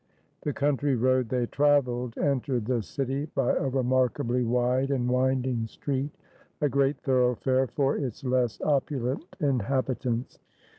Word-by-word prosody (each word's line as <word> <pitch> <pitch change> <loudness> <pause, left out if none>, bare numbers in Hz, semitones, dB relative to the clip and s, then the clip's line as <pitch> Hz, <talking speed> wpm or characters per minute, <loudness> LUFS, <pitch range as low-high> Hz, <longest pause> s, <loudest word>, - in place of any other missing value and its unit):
The 150 - -1
country 145 -1 +1
road 130 0 +2
they 125 -2 0
traveled 125 -4 +1
entered 130 -4 0
the 120 -1 0
city 135 +5 -3
by 135 -3 +2
a 135 - 0
remarkably 125 -1 +1
wide 125 +3 +1
and 130 -3 0
winding 125 -2 +1
street, 135 +4 -3 0.5
a 150 - +2
great 140 0 +1
thoroughfare 130 -1 +2
for 140 +2 0
its 135 -1 -4
less 125 -5 0
opulent 140 -2 0 0.2
inhabitants. 130 -2 -1
130 Hz, 130 wpm, -27 LUFS, 125-140 Hz, 0.5 s, road